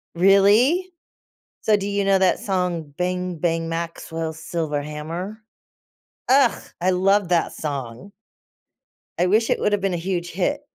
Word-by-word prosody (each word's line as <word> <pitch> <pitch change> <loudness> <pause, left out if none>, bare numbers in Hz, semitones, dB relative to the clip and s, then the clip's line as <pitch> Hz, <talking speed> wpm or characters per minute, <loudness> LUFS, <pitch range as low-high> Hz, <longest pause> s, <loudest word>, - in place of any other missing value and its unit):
Really? 205 - +4 0.7
So 215 - +4
do 200 -1 -4
you 200 0 0
know 195 -1 +4
that 190 -1 +3
song, 180 -6 -2
"bang, 180 0 -2
bang, 165 0 -1
Maxwell's 165 -1 -4
silver 160 -2 -3
hammer"? 165 +8 -6 0.9
Ugh! 265 -2 +4 0.2
I 185 - +2
love 195 +1 +2
that 175 -2 +1
song. 135 +1 -6 1.1
I - - +4
wish 215 +5 +2
it - - +1
would 210 - +1
have 205 - +1
been 195 -2 0
a - - -1
huge 175 0 -3
hit 285 - -1
180 Hz, 145 wpm, -22 LUFS, 165-200 Hz, 1.1 s, Really